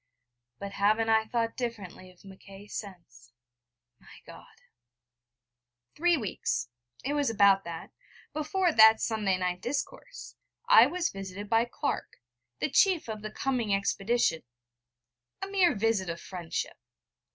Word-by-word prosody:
But 200 0 -7
haven't 215 +3 +1
I 220 0 +3
thought 230 0 -1
differently 210 -7 -6
of 180 +1 -21
Mackay 195 +1 -13
since, 165 - -10 0.7
my - - -16
God...? - - -14 1.4
Three 345 +1 +3
weeks 125 - -3 0.4
it 285 - -1
was 290 -3 +1
about 200 -3 +4
that 165 -1 -7 0.4
before 325 +4 0
that 220 -4 +7
Sunday 210 -4 0
night 180 0 -2
discourse, 280 - -5 0.3
I - - +8
was 350 -1 -1
visited 195 +2 -8
by 225 +1 +4
Clark, 280 +4 -4 0.4
the 305 - -1
chief 370 -5 +3
of 215 -1 -5
the 215 - -5
coming 235 -5 0
expedition 200 -2 0 1.0
a - - -4
mere 380 -7 +2
visit 205 -3 0
of 170 0 -4
friendship. 175 -3 -5
215 Hz, 130 wpm, -29 LUFS, 195-260 Hz, 1.4 s, I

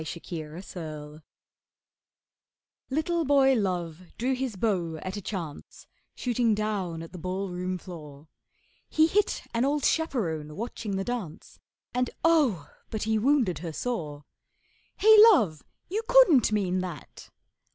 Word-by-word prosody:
THE - - -9
BLIND 155 -3 -6
ARCHER 155 -4 -8 1.7
Little 320 +4 0
boy 275 -2 +4
Love 180 -7 -2 0.2
drew 255 +3 0
his 255 -4 -3
bow 180 -5 -1
at 185 +4 -6
a 205 - -5
chance, 175 -7 -7 0.3
Shooting 240 -3 +1
down 195 -6 -2
at 165 - -11
the 180 - -9
ballroom 185 0 -3
floor; 155 -5 -11 0.6
He 315 - +4
hit 400 +6 +1
an 230 +1 +1
old 285 +1 +1
chaperone 165 - -1
watching 225 -1 -4
the 195 - -1
dance, 210 -9 -6 0.3
And 250 0 0 0.2
oh! 270 - +3 0.2
but 220 - -3
he 220 0 +1
wounded 235 - +2
her 165 0 -5
sore. 150 -11 -4 0.7
'Hey, 440 +1 +7 0.2
Love, 180 - +1 0.3
you 415 +5 -2
couldn't - - +6
mean 190 -3 0
that! 180 -6 -8
200 Hz, 130 wpm, -27 LUFS, 165-255 Hz, 1.7 s, Hey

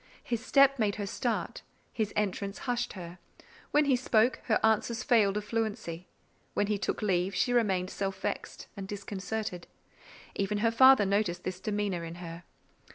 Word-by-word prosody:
His 235 -1 -3
step 275 +1 +5
made 210 -2 +1
her 205 - -3
start; 230 +3 -2 0.3
his 215 -2 -1
entrance 200 -1 -1
hushed 245 -1 -1
her; 175 -1 -9 0.5
when 295 0 +3
he 275 -2 +4
spoke, 245 -1 +2
her 220 - +2
answers 225 +2 +1
failed 210 -6 +3
of 210 - -4
fluency; 210 -6 -3 0.5
when 205 - +2
he 205 0 -1
took 215 - -2
leave, 185 -1 +1
she 220 +7 +1
remained 195 -6 +1
self 195 -1 -3
vexed - - -4
and 195 -2 -6
disconcerted. 200 -1 -5 0.7
Even 200 +1 -1
her 225 +2 +2
father 260 -2 +7
noticed 195 -3 0
this 185 0 -4
demeanour 205 -4 -2
in 165 0 -6
her. 170 -1 -9
205 Hz, 160 wpm, -30 LUFS, 190-230 Hz, 0.7 s, father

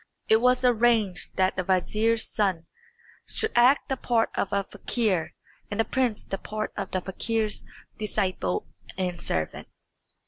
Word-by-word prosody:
It 220 +1 +5
was 250 +1 +4
arranged 225 -6 +2
that 185 0 +2
the 185 - -1
vizier's 215 +5 +2
son 190 -6 0 0.6
should 440 0 0
act 250 +4 +5
the 265 - -1
part 235 -2 +1
of - - -1
a 200 0 +1
fakir 195 -4 -1 0.3
and 205 - -4
the 225 - +3
prince 250 -5 0
the 195 - -4
part 215 0 -4
of 195 -1 -4
the 185 - -1
fakir's 215 +3 -1 0.3
disciple 185 - -1 0.3
and 180 -2 -2
servant. 80 -1 -2
215 Hz, 145 wpm, -26 LUFS, 185-230 Hz, 0.6 s, It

